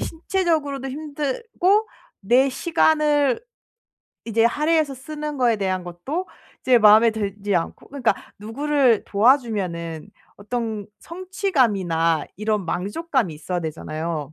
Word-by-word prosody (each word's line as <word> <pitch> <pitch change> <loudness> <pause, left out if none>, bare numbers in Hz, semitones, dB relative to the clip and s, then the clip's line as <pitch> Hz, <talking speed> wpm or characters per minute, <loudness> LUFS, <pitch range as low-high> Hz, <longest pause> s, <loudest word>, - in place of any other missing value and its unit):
신체적으로도 320 -6 -1
힘들고 310 - -1 0.3
내 245 +7 +3
시간을 295 -2 +2 0.9
이제 225 0 +2
할애해서 300 +3 +1
쓰는 300 +2 -6
거에 240 -3 +3
대한 185 -2 -1
것도 265 - -5 0.3
이제 250 -2 +5
마음에 220 +2 +7
들지 205 -2 -3
않고 165 - -4
그러니까 255 -7 +1 0.2
누구를 255 +2 +1
도와주면은 200 - +1 0.3
어떤 220 -1 -4
성취감이나 235 - 0
이런 210 -2 -1
만족감이 205 - -1
있어야 175 +4 -4
되잖아요. 155 -1 -4
240 Hz, 285 characters per minute, -22 LUFS, 195-295 Hz, 0.9 s, 마음에